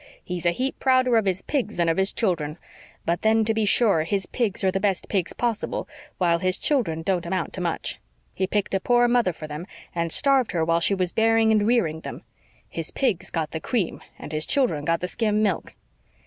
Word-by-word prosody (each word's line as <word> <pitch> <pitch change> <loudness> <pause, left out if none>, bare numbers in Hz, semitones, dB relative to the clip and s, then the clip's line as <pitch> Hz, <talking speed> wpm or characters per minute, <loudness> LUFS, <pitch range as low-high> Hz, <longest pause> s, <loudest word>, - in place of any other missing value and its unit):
He's 175 -1 -3
a - - +6
heap 260 +9 -3
prouder 255 -2 +3
of 220 -2 +3
his 190 -1 0
pigs 250 -7 -2
than 170 -1 +2
of 165 - +1
his 190 +1 +2
children. 170 -9 -1 0.5
But 170 +1 0
then, 220 0 +3
to 225 - +2
be 220 -1 +1
sure, 200 -5 +4
his 195 +3 -1
pigs 215 -6 -2
are 190 - +3
the 195 - -1
best 195 -2 0
pigs 190 -5 0
possible, 235 -3 -2 0.3
while 170 -2 +2
his 185 0 0
children 180 - 0
don't 185 -2 0
amount 185 -1 -2
to 185 - -4
much. 170 -2 -2 0.3
He 190 - -1
picked 205 0 -1
a 195 - +2
poor 240 +4 +3
mother 240 -6 +2
for 160 -2 -9
them, 155 +4 -7 0.3
and 170 -1 -2
starved 270 - +3
her 165 -2 +1
while 165 +1 +2
she 195 +4 +2
was 185 -2 0
bearing 225 0 +3
and 210 -1 +3
rearing 170 -10 +1
them. - - -8 0.4
His 165 -1 -4
pigs 235 -10 -1
got 160 -2 -3
the 160 - -4
cream 205 -2 -2 0.2
and - - -9
his 155 0 -1
children 235 - +1
got 165 +1 +1
the 180 - -2
skim 215 +2 0
milk. 195 -5 -1
190 Hz, 220 wpm, -24 LUFS, 170-225 Hz, 0.5 s, a